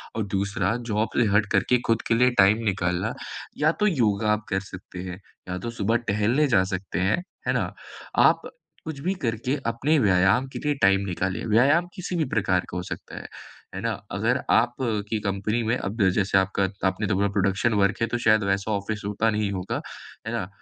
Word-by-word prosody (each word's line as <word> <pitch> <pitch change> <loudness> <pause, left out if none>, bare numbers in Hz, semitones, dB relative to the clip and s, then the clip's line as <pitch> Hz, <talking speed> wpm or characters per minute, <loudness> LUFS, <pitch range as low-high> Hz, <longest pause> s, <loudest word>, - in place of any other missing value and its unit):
और 110 -2 -1
दूसरा 100 +3 0
जॉब 110 +1 0
से 120 - +5
हट 105 0 +4
करके 125 - +3
खुद 115 -1 +2
के - - +2
लिए 125 +2 +4
टाइम 105 +4 +5
निकालना, 90 -3 0 0.4
या 155 +2 +3
तो 210 +4 0
योगा 110 - +2
आप 105 0 0
कर 95 -1 +1
सकते 95 -2 -10
हैं, 90 0 -7 0.3
या 90 - -2
तो 120 - -4
सुबह 115 0 0
टहलने 115 +9 +2
जा 100 -7 +4
सकते 95 -1 -3
हैं, 100 - +1 0.2
है - - +2
ना? - - -1 0.4
आप - - +5 0.4
कुछ 155 -3 -5
भी 190 - +2
करके 115 +4 -1
अपने 135 +7 +1
व्यायाम 95 +5 +3
के - - -4
लिए 150 0 +2
टाइम 95 0 +5
निकालिए। 95 0 -2
व्यायाम 140 +11 +4
किसी 180 -1 -4
भी 165 -3 +1
प्रकार 95 -3 +1
का 90 - -5
हो 90 - -3
सकता - - -8
है। - - -7 0.5
है - - -4
ना? - - 0 0.2
अगर 120 +6 0
आप 120 +1 +3 0.3
की 110 - 0
कंपनी 105 +3 -1
में 115 +3 +1
अब 100 -1 0
जैसे 95 +1 +1
आपका 95 0 +1
त 95 - -10
आपने 95 +2 0
तो 100 - +1
बोला 100 +1 +2
प्रोडक्शन 100 +4 +2
वर्क 100 +3 0
है, 115 - +2
तो 120 - -1
शायद 110 -2 +3
वैसा 100 +2 0
ऑफिस 105 +1 -3
होता 105 +2 +1
नहीं 105 -2 0
होगा। 95 -1 -3 0.5
है - - -2
ना? 90 - -2
105 Hz, 205 wpm, -25 LUFS, 95-115 Hz, 0.5 s, से